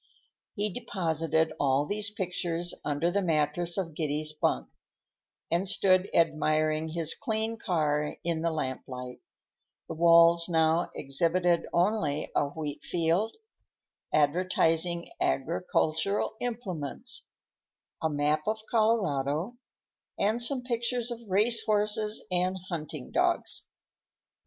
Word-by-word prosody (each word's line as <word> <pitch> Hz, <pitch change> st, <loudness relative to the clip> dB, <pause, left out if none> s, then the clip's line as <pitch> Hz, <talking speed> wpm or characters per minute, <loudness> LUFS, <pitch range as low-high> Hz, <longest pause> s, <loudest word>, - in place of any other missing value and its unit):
He 205 Hz, -1 st, 0 dB
deposited 165 Hz, -7 st, -1 dB
all 140 Hz, 0 st, +2 dB
these 205 Hz, +4 st, -2 dB
pictures 175 Hz, -4 st, -2 dB
under 150 Hz, +4 st, 0 dB
the 200 Hz, +2 st, +1 dB
mattress 165 Hz, +1 st, +1 dB
of 175 Hz, -5 st, -2 dB
Giddy's 155 Hz, 0 st, -2 dB
bunk, 65 Hz, -, 0 dB, 0.8 s
and 180 Hz, +3 st, +1 dB
stood 185 Hz, -1 st, +3 dB
admiring 155 Hz, -1 st, +1 dB
his 165 Hz, -1 st, +2 dB
clean 220 Hz, -1 st, -2 dB
car 150 Hz, -8 st, -1 dB
in 165 Hz, -1 st, -1 dB
the 170 Hz, -, +1 dB
lamplight; 130 Hz, -4 st, -5 dB, 0.7 s
the -, -, -5 dB
walls 170 Hz, +1 st, +5 dB
now 160 Hz, +1 st, +2 dB
exhibited 170 Hz, +5 st, +1 dB
only 170 Hz, -5 st, 0 dB
a -, -, +3 dB
wheatfield, 165 Hz, +6 st, -1 dB, 0.8 s
advertising 170 Hz, +2 st, +1 dB
agricultural 160 Hz, +5 st, 0 dB
implements, 200 Hz, -, -4 dB, 0.7 s
a 160 Hz, -, +1 dB
map 150 Hz, +1 st, 0 dB
of 220 Hz, +1 st, 0 dB
Colorado, 190 Hz, -, +1 dB, 0.6 s
and 220 Hz, +4 st, +1 dB
some 250 Hz, +1 st, +3 dB
pictures 240 Hz, 0 st, -1 dB
of 235 Hz, 0 st, -6 dB
race 220 Hz, +4 st, +3 dB
horses 210 Hz, 0 st, +1 dB
and 180 Hz, +1 st, +1 dB
hunting 155 Hz, -5 st, -5 dB
dogs. -, -, 0 dB
170 Hz, 105 wpm, -28 LUFS, 155-205 Hz, 0.8 s, walls